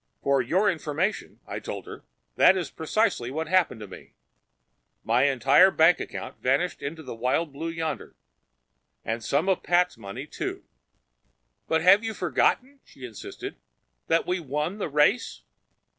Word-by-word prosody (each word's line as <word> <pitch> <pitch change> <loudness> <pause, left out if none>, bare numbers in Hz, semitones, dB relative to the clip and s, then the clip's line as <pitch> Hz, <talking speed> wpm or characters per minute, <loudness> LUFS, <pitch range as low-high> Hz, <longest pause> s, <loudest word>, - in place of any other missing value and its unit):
"For 140 -1 +3
your 180 - +1
information," 170 +2 -2
I - - -5
told - - -7
her, - - -10 0.3
"that 190 - +6
is 175 -6 -4
precisely 160 - 0
what 160 +4 -3
happened 170 -10 +1
to 105 - -7
me. 95 - -13 0.9
My 120 +4 +3
entire 135 - +5
bank 165 -1 +4
account - - -7
vanished 140 +8 0
into 160 +3 -6
the - - -7
wild 130 +7 -1
blue 160 +4 -5
yonder. 165 -1 -4 0.9
And 115 0 -3
some 145 - 0
of 190 -2 +1
Pat's 180 -7 +1
money, 100 -2 -7
too." - - -5 1.0
"But 160 0 +1
have 195 +5 +6
you 225 -1 -3
forgotten," 255 - 0
she 130 - -12
insisted, 115 -4 -8 0.5
"that 165 - +2
we 180 +1 -1
won 150 +6 -3
the 185 - -2
race? 150 - +1
160 Hz, 150 wpm, -26 LUFS, 135-180 Hz, 1.0 s, that